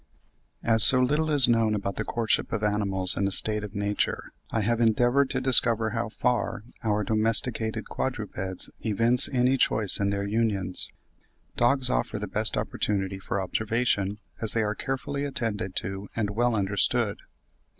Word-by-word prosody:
As 110 -1 +4
so 130 - +7
little 150 +5 +1
is 145 -5 +5
known 115 -2 +2
about 100 -2 -4
the - - -2
courtship 115 -2 -1
of 110 -2 -3
animals 100 -3 +1
in 100 - 0
a - - -3
state 105 +3 +2
of 105 0 -8
nature, 100 0 -2 0.2
I 115 - -1
have 115 +3 0
endeavoured 120 +4 +2
to 130 - -1
discover 115 -4 +5
how 115 0 -3
far 120 -2 -2 0.2
our 105 -1 0
domesticated 110 +1 0
quadrupeds 100 -7 -3
evince 115 +3 +2
any 130 +1 +1
choice 110 -5 +3
in 100 0 0
their 100 0 -2
unions. 100 -4 -1 0.7
Dogs 125 +1 +1
offer 110 - -1
the 105 - -4
best 110 +3 0
opportunity 100 -2 -2
for 95 - -4
observation, 105 0 -1 0.2
as 110 -2 -1
they 115 - +1
are 105 0 -1
carefully 135 +4 -4
attended 110 -9 -3
to 95 +1 -5
and 105 -3 -2
well 120 +2 0
understood. 100 -1 0
110 Hz, 160 wpm, -26 LUFS, 100-120 Hz, 0.7 s, so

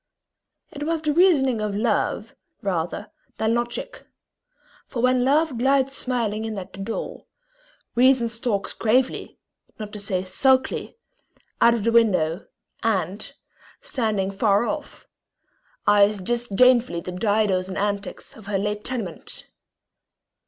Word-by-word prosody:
It 290 - -9
was 320 +1 -1
the 300 -1 +1
reasoning 285 - +4
of 210 -1 -2
love, 220 0 0 0.3
rather 185 +2 -2 0.3
than 220 +1 +1
logic; 240 - -3 0.8
for 250 - -5
when 255 +1 +3
love 285 -1 +2
glides 270 +1 +2
smiling 230 -5 -1
in 220 -2 -4
at 185 -2 -7
the - - -10
door, 210 +4 -5 0.7
reason 250 0 +4
stalks 225 -3 -2
gravely, 250 +4 0 0.4
not 210 -1 -7
to 210 - -6
say 195 -2 -1
sulkily, 260 - +1 0.6
out 235 0 +6
of 225 - -3
the 230 - +2
window, 190 -7 +2 0.3
and, 195 -2 -1 0.5
standing 220 - -1
afar 200 +2 +2
off, 300 +2 -5 0.8
eyes 205 0 +5
disdainfully 240 -1 +3
the 180 - -6
didos 195 -1 +1
and 185 - -5
antics 200 0 -3
of 215 -3 -14
her 205 -1 0
late 210 +1 -2
tenement. 220 -10 -5
225 Hz, 125 wpm, -24 LUFS, 200-255 Hz, 0.8 s, out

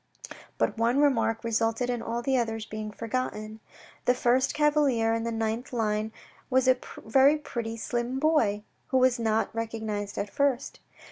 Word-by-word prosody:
But - - 0
one 235 +3 +2
remark 255 -6 +2
resulted 225 +1 0
in 245 -1 -2
all 235 +1 -3
the 265 +1 +1
others 225 -3 -1
being 215 0 -5
forgotten; 220 -1 -4 0.5
the 250 - +4
first 250 +2 +2
cavalier 290 -7 +3
in 230 0 -1
the 230 - -1
ninth 225 +2 -2
line 215 -2 -1 0.4
was 260 0 +3
a 255 - +6 0.3
very 270 +6 +5
pretty, 230 -6 -5
slim 240 +2 -2
boy, 265 -9 +2 0.2
who 260 - +1
was 255 -1 +3
not 220 -1 0
recognised 220 -3 -4
at 200 0 -3
first. 275 -2 0
230 Hz, 155 wpm, -27 LUFS, 220-260 Hz, 0.5 s, a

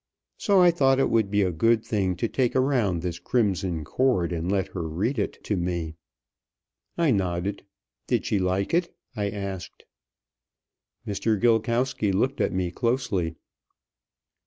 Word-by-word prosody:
So 200 -2 +4
I 175 - +7
thought 135 -5 +3
it 135 - +2
would 110 -3 +2
be 105 0 +2
a 90 - +1
good 115 +7 +2
thing 95 -4 0
to 115 - -1
take 125 +1 0
around 120 -10 +1
this 90 -2 -3
'Crimson 95 -8 0
Cord' 110 - +1
and 85 +2 -2
let 95 -2 0
her 85 -4 -4
read 110 - -1
it 100 - -1
to 105 - -1
me." 85 -3 -2 1.0
I 165 -4 +3
nodded. 95 -1 -1 0.5
"Did - - 0
she 105 - +1
like 95 - 0
it?" 170 +1 +1 0.2
I 105 -2 -1
asked. 100 -3 -6 1.2
Mr. 105 0 0
Gilkowsky 115 -1 +1
looked 125 +8 0
at - - +1
me 90 -2 -1
closely. 115 -9 -1
100 Hz, 150 wpm, -25 LUFS, 90-120 Hz, 1.2 s, I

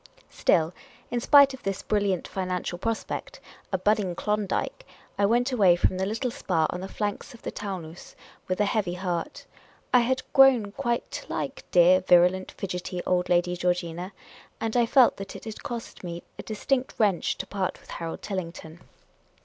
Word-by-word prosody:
Still, 165 +1 +2 0.4
in 240 - 0
spite 280 +2 +6
of 265 - -9
this 195 0 -3
brilliant 200 -4 0
financial 180 -2 -3
prospect, 230 - -4 0.3
a 190 - +1
budding 195 -2 +1
Klondike, 210 - -2 0.4
I 200 - +4
went 245 +4 +2
away 195 -8 +5
from 185 +1 +1
the 190 - 0
little 230 +4 -2
Spa 180 - 0
on 180 - -5
the 190 - -5
flanks 205 +4 -4
of 230 - -17
the - - -4
Taunus 180 -5 -7 0.3
with 185 - -1
a 210 - +4
heavy 200 -4 0
heart. 175 -2 -4 0.5
I 250 - +8
had 255 +2 0
grown 260 -7 +6
quite 240 0 -2
to - - -6
like - - -4
dear, 180 +1 +6
virulent, 180 +1 +4
fidgety 180 -1 -4
old 180 -1 +1
Lady 175 0 +2
Georgina; 175 0 -2 0.5
and 225 0 -2
I 240 -1 +4
felt 255 0 +5
that 195 0 -7
it - - -9
had 220 -1 -7
cost 235 -4 -7
me 170 -1 -6 0.2
a - - -2
distinct 255 +4 -1
wrench 205 -5 +1
to - - -4
part 190 -2 -3
with - - -15
Harold 165 -1 -6
Tillington. 170 -4 -6
195 Hz, 175 wpm, -26 LUFS, 180-230 Hz, 0.5 s, I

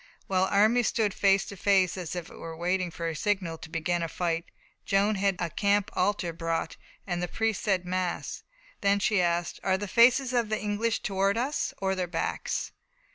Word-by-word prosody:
While 190 -1 +2
the - - -4
armies 220 +4 +4
stood 210 -4 +1
face 195 -1 +3
to 200 - -8
face, 190 -2 +3
as 180 -2 -5
it 175 -2 -5
were 165 -1 -9
waiting 180 +1 0
for 170 0 -4
a 165 - -3
signal 185 -3 -1
to - - -10
begin 170 +2 -1
to 165 - -1
fight, 170 0 -2 0.4
Joan 200 +2 +2
had 195 -1 +1
a 170 -2 -2
camp 205 +3 +1
altar 185 -3 0
brought, 165 0 -2 0.3
and 175 -2 -2
the 180 - -1
priests 225 +2 -1
said 190 -4 +1
mass. 180 0 -2 0.4
Then 200 0 +3
she 200 -1 +2
asked: 175 0 0
"Are 190 -1 +1
the 205 +1 -4
faces 250 +4 +4
of 235 -3 +1
the 215 - 0
English 210 +2 -1
towards 195 +1 +1
us, 265 +5 -1
or 190 0 0
their 185 -1 -2
backs?" 165 -1 -2
190 Hz, 195 wpm, -28 LUFS, 175-205 Hz, 0.4 s, armies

